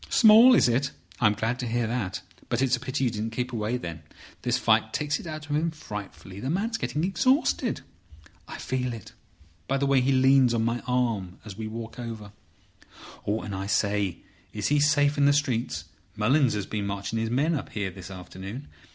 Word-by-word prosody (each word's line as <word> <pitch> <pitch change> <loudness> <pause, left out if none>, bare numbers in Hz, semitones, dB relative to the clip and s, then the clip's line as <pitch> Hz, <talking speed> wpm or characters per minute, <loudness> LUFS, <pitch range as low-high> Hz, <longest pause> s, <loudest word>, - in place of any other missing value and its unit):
"Small! 230 +3 +8
Is - - +5
it? 130 +4 +1 0.3
I'm 105 -3 +4
glad 115 +4 -1
to 125 - -3
hear 120 +1 0
that. 105 -5 -2 0.3
But 120 +2 +1
it's 130 -1 +3
a - - -7
pity 130 +3 -2
you 125 - +2
didn't 110 +1 -4
keep 125 +1 -3
away, 110 +2 -1
then. 85 -8 -7 0.4
This - - +1
fight - - +2
takes 150 0 -1
it - - -9
out 155 -2 -6
of 145 - -1
him 160 +3 +1
frightfully. 105 - -8
The 130 - -3
man's 220 +8 -1
getting 150 - -2
exhausted. 255 - +1 0.7
I - - -7
feel 125 -1 -2
it 115 0 -10 0.5
by 135 - +1
the 140 - 0
way 135 -1 +4
he 130 +2 +2
leans 130 -2 +5
on 110 -1 +1
my 115 +1 0
arm 115 -8 0
as 105 -3 -8
we 110 +1 -5
walk 115 +1 -7
over. 110 -4 -7 1.0
And, 105 -1 -2
I 95 +1 -4
say, 100 -3 0 0.3
is 105 -1 -1
he 145 0 +3
safe 145 0 +3
in 140 - +5
the 145 - +5
streets? 120 - -1 0.3
Mullins 125 +3 +3
has 100 -2 -2
been 105 -2 -3
marching 100 +3 -3
his 110 0 -1
men 140 +8 +1
up 145 - -3
here 100 -3 -3
this 95 -1 -10
afternoon. 95 +7 -8
120 Hz, 200 wpm, -26 LUFS, 105-140 Hz, 1.0 s, Small